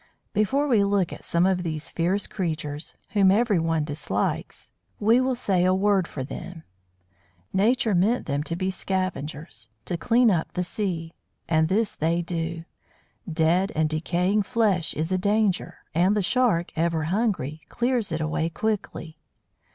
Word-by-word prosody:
Before 270 +8 +1
we 225 -7 +4
look 200 -3 +1
at - - -10
some 170 +1 +2
of 190 -1 +2
these 155 -2 -4
fierce 180 +4 0
creatures, 155 -5 -4
whom 200 -3 +4
everyone 180 -7 +2
dislikes, 150 0 -3 0.3
we 225 +4 +4
will 260 0 +1
say 195 -7 +1
a 185 +1 +3
word 195 -2 +2
for 130 - -5
them. 165 +5 -8 0.9
Nature 225 +3 +2
meant 205 +7 +2
them 140 -1 -1
to 165 - -2
be 185 +2 -1
scavengers, 160 - -4 0.2
to 175 - -2
clean 235 +5 +4
up 165 -4 -1
the 180 - -1
sea. 175 -4 -3 0.3
And 160 -1 +3
this 205 +4 +1
they 165 +2 0
do. 165 -1 -4 0.7
Dead 165 +5 +2
and 155 0 +2
decaying 175 +6 +1
flesh 205 -6 +1
is 160 +4 -2
a 185 - +1
danger, 205 -1 +1 0.2
and 185 +5 +3
the 205 - +1
Shark, 210 -6 +2
ever 165 -1 0
hungry, 170 - -1
clears 240 -5 0
it 160 -1 -2
away 155 +1 -1
quickly. 170 -4 -3
180 Hz, 150 wpm, -25 LUFS, 165-205 Hz, 0.9 s, we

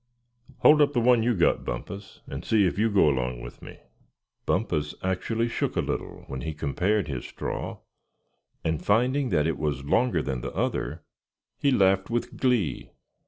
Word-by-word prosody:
"Hold 150 0 +7
up 145 0 +4
the 125 - +2
one 120 0 +4
you 120 +1 +2
got, 85 - +2
Bumpus, 100 - -6
and 70 +4 -6
see 110 -3 +3
if 90 +2 -1
you 115 +1 +3
go 100 -6 +4
along 65 -3 0
with - - -10
me." - - -11 0.7
Bumpus 75 -1 0
actually 110 +5 0
shook - - -2
a - - +1
little - - -3
when 65 -1 -5
he 80 +3 -4
compared 90 +7 0
his 65 -5 -4
"straw" - - -5 0.9
and 80 -2 -1
finding 125 +6 +2
that 75 -5 +2
it 80 - -1
was 70 -3 -2
longer 85 - +2
than 65 -3 -3
the - - -5
other, - - -2 0.6
he 140 - +3
laughed 95 -6 +3
with 120 0 -2
glee. 125 - 0
95 Hz, 170 wpm, -26 LUFS, 75-115 Hz, 0.9 s, Hold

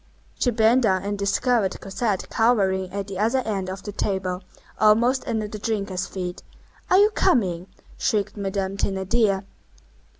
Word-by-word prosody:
She 250 - +2
bent 230 +2 +4
down 190 -5 +2
and 205 +1 -2
discovered 200 +1 +1
Cosette 195 0 -2
cowering 195 -5 +2
at 200 +1 -3
the 195 -1 -6
other 235 +5 +2
end 195 -4 -2
of 190 0 -6
the 205 - -5
table, 190 -2 -2 0.4
almost 235 +5 +3
under 220 -2 -1
the 210 0 -7
drinkers' 200 -4 -2
feet. 180 -2 -5 0.5
"Are 370 - +5
you 415 +2 +5
coming?" 185 - +1 0.3
shrieked 210 -2 0
Madame 195 -1 -3
Thénardier. 195 +1 +1
200 Hz, 145 wpm, -24 LUFS, 190-225 Hz, 0.5 s, Are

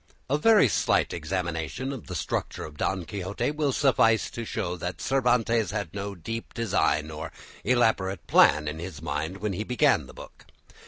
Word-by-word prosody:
A 145 - +4
very 215 -4 +6
slight - - +1
examination 85 - -3
of 130 - -9
the 90 - -5
structure - - -3
of 75 - -10
"Don 95 +3 -1
Quixote" 95 - -3
will 150 -2 0
suffice 120 -5 +3
to 120 - -5
show 90 -6 -3
that 90 -2 -5
Cervantes 120 -4 +2
had 100 -5 -4
no 100 0 -4
deep 115 +7 -6
design 85 -8 +1
or 80 +1 -6 0.3
elaborate 110 -7 +1
plan 75 0 +5
in 75 +2 -4
his 85 -2 -7
mind 85 +5 -3
when 105 0 -2
he 100 +4 -3
began 125 +1 +2
the - - -12
book. - - -13
100 Hz, 170 wpm, -27 LUFS, 85-120 Hz, 0.3 s, very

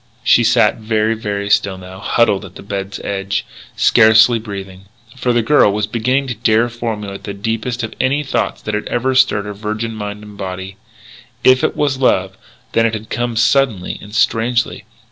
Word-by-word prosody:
She 120 - +5
sat 120 +1 +3
very, 110 0 0
very 100 -2 -3
still 100 -2 +2
now, 95 0 -11
huddled 105 -1 +1
on 95 -2 -12
the - - -10
bed's 100 0 -5
edge, 100 0 -3 0.3
scarcely 110 +1 +5
breathing. 95 -3 -8 0.3
For 125 -1 0
the 120 -1 +2
girl 115 -4 +4
was 105 +1 -1
beginning 125 +6 0
to 125 - -3
dare 115 +1 +2
formulate 110 -4 -5
the 100 - -5
deepest 115 +4 -3
of 110 - -4
any 140 +3 +1
thoughts 135 - -2
that 105 - -4
ever 120 +4 -1
had 130 - +1
stirred 105 -6 +2
her 105 - -5
virgin 110 +2 -4
mind 105 -1 -6
and 105 -1 -12
body. 95 0 -6 0.7
If 130 0 +5
it - - +1
was 140 -3 0
love, 95 -7 +1 0.4
then 115 0 +3
it 110 - -2
had 110 0 -8
come 120 -1 -2
suddenly, 115 -5 +1
and 105 +1 -10
strangely. 115 -1 0
110 Hz, 185 wpm, -17 LUFS, 100-120 Hz, 0.7 s, She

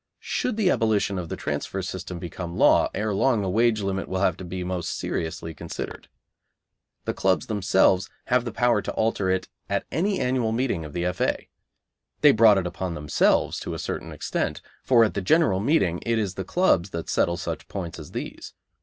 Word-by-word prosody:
Should 250 -4 -2
the 195 -5 +3
abolition 105 -3 +1
of 85 -2 -6
the - - -3
transfer 75 +6 -3
system 95 -2 -5
become 85 0 -6
law, - - +5
ere 105 +1 -1
long 115 +1 +2
the 95 - -1
wage 110 +1 +3
limit 95 0 -2
will 95 0 -1
have 90 -4 +3
to - - -8
be 90 +1 -5
most 90 -1 -3
seriously 80 0 -3
considered. - - -7 1.0
The - - -1
clubs 95 -1 +1
themselves 95 -2 +2 0.2
have 125 -1 +2
the 120 - -4
power 120 -1 +2
to - - -4
alter 110 -4 0
it 95 0 0 0.2
at - - -1
any 195 +4 0
annual 125 -3 0
meeting 115 -8 0
of 75 - -9
the 85 0 -2
F.A. 90 -2 -1 0.7
They 150 - +8
brought 110 -4 +6
it 95 - 0
upon 90 0 -4
themselves 75 -2 +2
to - - -5
a - - -4
certain - - -4
extent, - - -3 0.2
for 120 -3 +5
at 110 - +1
the 100 - -2
general 100 - +3
meeting 95 - +1
it 115 0 +1
is 100 -4 -1
the 95 - -4
clubs 100 - +2
that 85 -2 -5
settle 85 0 +1
such - - -5
points 85 -5 -5
as 75 - -9
these. - - -7
95 Hz, 195 wpm, -25 LUFS, 90-115 Hz, 1.0 s, They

